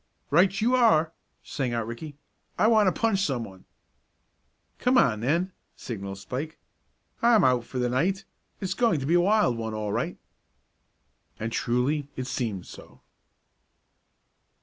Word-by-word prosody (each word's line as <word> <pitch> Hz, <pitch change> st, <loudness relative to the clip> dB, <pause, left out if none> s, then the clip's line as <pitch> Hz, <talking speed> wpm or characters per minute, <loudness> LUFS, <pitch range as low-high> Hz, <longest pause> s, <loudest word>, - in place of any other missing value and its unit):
"Right 185 Hz, +6 st, +4 dB
you 235 Hz, +4 st, +2 dB
are!" 165 Hz, -11 st, +4 dB, 0.3 s
sang 130 Hz, -4 st, -3 dB
out 115 Hz, -2 st, -1 dB
Ricky. 140 Hz, +6 st, -8 dB, 0.4 s
"I -, -, +3 dB
want 220 Hz, -2 st, +5 dB
to 185 Hz, -, 0 dB
punch 225 Hz, -4 st, +2 dB
someone." 115 Hz, -, -4 dB, 1.1 s
"Come 250 Hz, +1 st, +3 dB
on 110 Hz, -5 st, +3 dB
then," 170 Hz, -, 0 dB, 0.2 s
signalled 100 Hz, -4 st, -6 dB
Spike. 135 Hz, +10 st, -6 dB, 0.6 s
"I'm 230 Hz, -4 st, +5 dB
out 125 Hz, -2 st, +3 dB
for 130 Hz, -, -7 dB
the 125 Hz, -1 st, +1 dB
night. 175 Hz, +11 st, 0 dB, 0.4 s
It's 190 Hz, -, -1 dB
going 230 Hz, -11 st, +2 dB
to -, -, -3 dB
be 160 Hz, -, +1 dB
a 175 Hz, -, +5 dB
wild 200 Hz, -, +2 dB
one 110 Hz, -1 st, -4 dB
all 105 Hz, -1 st, -3 dB
right." -, -, -2 dB, 1.2 s
And 110 Hz, +1 st, -3 dB
truly 130 Hz, +6 st, 0 dB
it 130 Hz, -, -4 dB
seemed 110 Hz, -8 st, -3 dB
so. -, -, -14 dB
140 Hz, 145 wpm, -26 LUFS, 120-190 Hz, 1.2 s, want